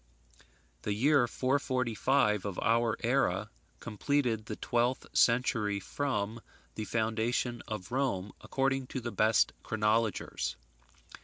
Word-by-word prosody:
The 105 Hz, -, -1 dB
year 135 Hz, +2 st, +4 dB
445 130 Hz, -4 st, +1 dB
of 100 Hz, -3 st, -4 dB
our 115 Hz, 0 st, +2 dB
era -, -, +1 dB, 0.3 s
completed 115 Hz, -1 st, -1 dB
the -, -, -4 dB
twelfth 120 Hz, +1 st, 0 dB
century 115 Hz, -4 st, +2 dB
from 115 Hz, -1 st, -2 dB, 0.3 s
the 110 Hz, -, -4 dB
foundation 115 Hz, +2 st, -1 dB
of 105 Hz, -3 st, -6 dB
Rome, 120 Hz, -8 st, -1 dB
according 135 Hz, -1 st, 0 dB
to 130 Hz, -, -4 dB
the 120 Hz, -1 st, -5 dB
best 110 Hz, +2 st, +3 dB
chronologers. 110 Hz, 0 st, 0 dB
115 Hz, 105 wpm, -31 LUFS, 105-130 Hz, 0.3 s, year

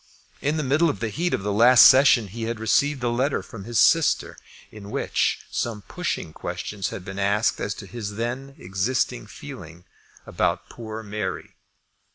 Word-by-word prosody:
In 150 Hz, +3 st, 0 dB
the 155 Hz, -, -1 dB
middle 145 Hz, +5 st, +3 dB
of 145 Hz, -, -3 dB
the 115 Hz, -, -2 dB
heat 170 Hz, +9 st, -1 dB
of -, -, -1 dB
the 105 Hz, 0 st, -1 dB
last 120 Hz, +4 st, +7 dB
session 130 Hz, -5 st, +6 dB
he 115 Hz, +3 st, -5 dB
had 115 Hz, 0 st, -3 dB
received 130 Hz, +5 st, +1 dB
a 120 Hz, -, +1 dB
letter 130 Hz, +4 st, 0 dB
from 110 Hz, -6 st, -10 dB
his 120 Hz, 0 st, -3 dB
sister, 165 Hz, +6 st, +3 dB, 0.4 s
in 105 Hz, -2 st, -10 dB
which -, -, -1 dB
some 110 Hz, -3 st, -3 dB
pushing 80 Hz, -, -4 dB
question 105 Hz, +5 st, -6 dB
had 90 Hz, -, -8 dB
been 95 Hz, 0 st, -6 dB
asked 100 Hz, +2 st, +1 dB
as 100 Hz, -, -2 dB
to 100 Hz, -, -9 dB
his 105 Hz, -1 st, -6 dB
then 125 Hz, +5 st, -4 dB
existing 95 Hz, -, -2 dB
feeling 85 Hz, +2 st, -11 dB, 0.4 s
about -, -, -1 dB
poor 110 Hz, -1 st, -7 dB
Mary. 105 Hz, 0 st, -5 dB
115 Hz, 175 wpm, -24 LUFS, 100-130 Hz, 0.4 s, last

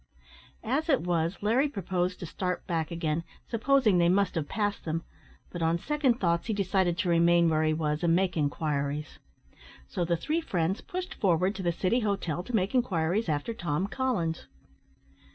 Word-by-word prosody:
As 275 Hz, +8 st, -1 dB
it 275 Hz, -, +4 dB
was, 170 Hz, 0 st, 0 dB
Larry 250 Hz, +7 st, +3 dB
proposed 185 Hz, -, -2 dB
to -, -, -4 dB
start 180 Hz, +2 st, -3 dB
back 165 Hz, -3 st, -1 dB
again, 165 Hz, -1 st, -1 dB, 0.2 s
supposing 230 Hz, -4 st, +3 dB
they 170 Hz, 0 st, +4 dB
must 200 Hz, +2 st, +2 dB
have 160 Hz, -4 st, -3 dB
passed 205 Hz, -2 st, -1 dB
them; 165 Hz, +1 st, -2 dB, 0.5 s
but, 175 Hz, -, -5 dB
on 165 Hz, +1 st, +2 dB
second 270 Hz, -, +1 dB
thoughts, 170 Hz, 0 st, +1 dB
he 220 Hz, -, 0 dB
decided 190 Hz, -3 st, +1 dB
to 180 Hz, -, 0 dB
remain 170 Hz, 0 st, +4 dB
where 155 Hz, 0 st, +2 dB
he 155 Hz, 0 st, +2 dB
was 150 Hz, 0 st, -1 dB
and 170 Hz, -1 st, +4 dB
make 185 Hz, -1 st, +1 dB
inquiries. 145 Hz, -1 st, -2 dB, 0.7 s
So 180 Hz, -, -2 dB
the 170 Hz, 0 st, +1 dB
three 310 Hz, -, -1 dB
friends 185 Hz, -, -1 dB
pushed 365 Hz, 0 st, -5 dB
forward 185 Hz, -1 st, +2 dB
to 200 Hz, -, -6 dB
the 175 Hz, -2 st, +1 dB
City 185 Hz, +7 st, +1 dB
Hotel 195 Hz, -7 st, -1 dB
to 235 Hz, +6 st, -4 dB
make 195 Hz, +1 st, +1 dB
inquiries 195 Hz, -5 st, +1 dB
after 150 Hz, +9 st, -1 dB
Tom 175 Hz, -3 st, -1 dB
Collins. 205 Hz, -9 st, -2 dB
180 Hz, 175 wpm, -28 LUFS, 165-215 Hz, 0.7 s, it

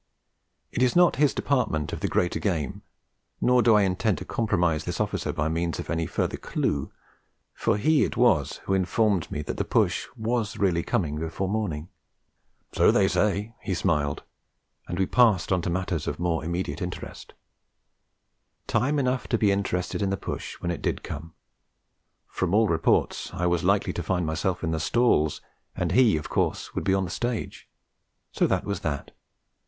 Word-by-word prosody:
It -, -, -2 dB
is 125 Hz, -1 st, +3 dB
not 175 Hz, -1 st, +5 dB
his 145 Hz, 0 st, +4 dB
department 110 Hz, -, 0 dB
of -, -, -3 dB
the -, -, -1 dB
greater 90 Hz, -, 0 dB
game; 80 Hz, -9 st, -2 dB, 0.6 s
nor 125 Hz, 0 st, +4 dB
do 115 Hz, -2 st, +5 dB
I 105 Hz, -, +5 dB
intend 95 Hz, +2 st, +1 dB
to 90 Hz, -, -7 dB
compromise 85 Hz, -9 st, 0 dB
this -, -, -3 dB
officer -, -, -1 dB
by 75 Hz, -, -1 dB
means 85 Hz, +1 st, -1 dB
of -, -, -5 dB
any 85 Hz, -1 st, -1 dB
further -, -, -1 dB
clue; 70 Hz, -2 st, -2 dB, 0.6 s
for -, -, 0 dB
he 155 Hz, +8 st, +3 dB
it -, -, -2 dB
was 110 Hz, -, +2 dB
who 95 Hz, -, 0 dB
informed 95 Hz, -1 st, +1 dB
me 75 Hz, -, -3 dB
that -, -, -5 dB
the -, -, 0 dB
push -, -, +1 dB
was 110 Hz, -1 st, -1 dB
really 90 Hz, -4 st, +2 dB
coming 75 Hz, -4 st, -1 dB
before 80 Hz, +4 st, -3 dB
morning. 95 Hz, -7 st, -2 dB, 0.9 s
'So -, -, +4 dB
they -, -, +4 dB
say,' 105 Hz, +2 st, 0 dB
he 95 Hz, -4 st, -2 dB
smiled, 75 Hz, -6 st, 0 dB, 0.6 s
and 85 Hz, -, -4 dB
we 95 Hz, -, +2 dB
passed 110 Hz, -5 st, +3 dB
on 90 Hz, -2 st, +2 dB
to 85 Hz, -, -2 dB
matters 90 Hz, -3 st, -2 dB
of 75 Hz, -, -2 dB
more 85 Hz, -2 st, 0 dB
immediate 85 Hz, +5 st, -3 dB
interest. 90 Hz, -1 st, -7 dB, 1.3 s
Time 145 Hz, +4 st, +1 dB
enough 130 Hz, -2 st, 0 dB
to 115 Hz, -, +1 dB
be 105 Hz, -2 st, +3 dB
interested 95 Hz, -1 st, -1 dB
in 100 Hz, -, +1 dB
the 100 Hz, -, -1 dB
push -, -, -5 dB
when 85 Hz, -, -1 dB
it 85 Hz, -, -5 dB
did -, -, -2 dB
come; 80 Hz, +3 st, -7 dB, 0.9 s
from 90 Hz, -, -1 dB
all 110 Hz, +1 st, +4 dB
reports 80 Hz, -4 st, +1 dB
I 90 Hz, -, -1 dB
was 85 Hz, -1 st, +1 dB
likely -, -, +2 dB
to -, -, -3 dB
find 90 Hz, -3 st, -1 dB
myself 85 Hz, +4 st, -1 dB
in 80 Hz, -, 0 dB
the 80 Hz, -, -1 dB
stalls, 80 Hz, -5 st, +2 dB, 0.3 s
and 90 Hz, -2 st, -1 dB
he 115 Hz, -3 st, +5 dB
of 75 Hz, -, -5 dB
course -, -, -1 dB
would -, -, -3 dB
be 95 Hz, -, +3 dB
on 95 Hz, -, +1 dB
the 90 Hz, -, -6 dB
stage. 115 Hz, -7 st, -4 dB, 0.6 s
So -, -, +2 dB
that -, -, 0 dB
was 100 Hz, 0 st, -2 dB
that. 70 Hz, -3 st, -4 dB
95 Hz, 180 wpm, -26 LUFS, 80-110 Hz, 1.3 s, not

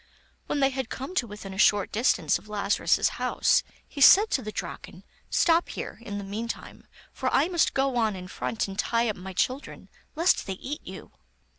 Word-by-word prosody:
When 285 Hz, -, -1 dB
they 270 Hz, 0 st, +3 dB
had 260 Hz, -2 st, -4 dB
come 270 Hz, +7 st, -6 dB
to 255 Hz, -10 st, 0 dB
within 205 Hz, -2 st, -9 dB
a 190 Hz, -, -8 dB
short; 205 Hz, -2 st, +4 dB
distance 200 Hz, -, +2 dB
of 215 Hz, -, -19 dB
Lazarus's 205 Hz, -1 st, +1 dB
house, -, -, +3 dB, 0.3 s
he 285 Hz, -, -8 dB
said 410 Hz, +9 st, +8 dB
to 265 Hz, -, +1 dB
the 215 Hz, -2 st, -6 dB
Draken: -, -, -7 dB, 0.3 s
'Stop 335 Hz, 0 st, +3 dB
here, -, -, -6 dB
in 205 Hz, -3 st, -6 dB
the 200 Hz, -, -5 dB
meantime, 215 Hz, +4 st, -6 dB, 0.3 s
for -, -, -2 dB
I -, -, +3 dB
must 350 Hz, -2 st, +1 dB
go 270 Hz, -1 st, +1 dB
on 220 Hz, -3 st, +1 dB
in 180 Hz, -1 st, -8 dB
front 220 Hz, +4 st, -3 dB
and 195 Hz, 0 st, -8 dB
tie 230 Hz, 0 st, +1 dB
up 210 Hz, -, -2 dB
my 190 Hz, +1 st, -8 dB
children, 255 Hz, +9 st, -3 dB, 0.3 s
lest 335 Hz, -, +2 dB
they 195 Hz, -, -2 dB
eat 285 Hz, -, -6 dB
you. -, -, -10 dB
230 Hz, 195 wpm, -26 LUFS, 200-270 Hz, 0.3 s, said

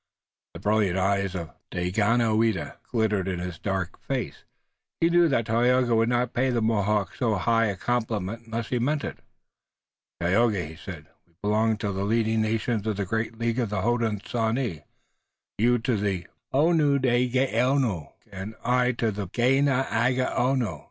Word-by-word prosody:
The -, -, -7 dB
brilliant 105 Hz, -3 st, +1 dB
eyes 100 Hz, 0 st, 0 dB
of 85 Hz, -3 st, -5 dB, 0.2 s
Daganoweda 110 Hz, -1 st, +1 dB
glittered 105 Hz, -5 st, 0 dB
in 95 Hz, -2 st, -2 dB
his 85 Hz, -2 st, -5 dB
dark 95 Hz, -3 st, -3 dB
face. -, -, -4 dB, 0.5 s
He 165 Hz, +1 st, +3 dB
knew 175 Hz, 0 st, +5 dB
that 115 Hz, -7 st, +1 dB
Tayoga 120 Hz, +2 st, +2 dB
would 115 Hz, +1 st, +3 dB
not 125 Hz, 0 st, 0 dB
pay 130 Hz, +2 st, +1 dB
the 120 Hz, -2 st, +1 dB
Mohawks 105 Hz, -2 st, 0 dB
so 115 Hz, -4 st, +1 dB
high 115 Hz, +4 st, +2 dB
a 100 Hz, -, -2 dB
compliment 115 Hz, -2 st, -2 dB
unless 115 Hz, 0 st, -4 dB
he 125 Hz, -, 0 dB
meant 145 Hz, +4 st, 0 dB
it. -, -, -5 dB, 1.0 s
"Tayoga," 95 Hz, +2 st, +2 dB
he 80 Hz, +1 st, -9 dB
said, -, -, -9 dB, 0.2 s
"we 85 Hz, -, -33 dB
belong 110 Hz, +1 st, +2 dB
to 105 Hz, -1 st, -2 dB
the 95 Hz, 0 st, -2 dB
leading 110 Hz, +1 st, +1 dB
nations 110 Hz, 0 st, -1 dB
of 105 Hz, -2 st, -1 dB
the 100 Hz, -, -1 dB
great 110 Hz, +3 st, -2 dB
League 115 Hz, +1 st, -1 dB
of 120 Hz, -4 st, 0 dB
the 95 Hz, -2 st, -2 dB
Hodenosaunee, 115 Hz, -, -1 dB, 0.7 s
you 120 Hz, +3 st, +4 dB
to 120 Hz, +1 st, 0 dB
the 100 Hz, -4 st, -1 dB, 0.3 s
Onundahgaono 130 Hz, -, +2 dB, 0.2 s
and 100 Hz, +3 st, -7 dB
I 125 Hz, +1 st, +3 dB
to 115 Hz, -1 st, 0 dB
the 100 Hz, -2 st, -4 dB
Ganeagaono. 130 Hz, 0 st, +1 dB
115 Hz, 150 wpm, -26 LUFS, 100-125 Hz, 1.0 s, knew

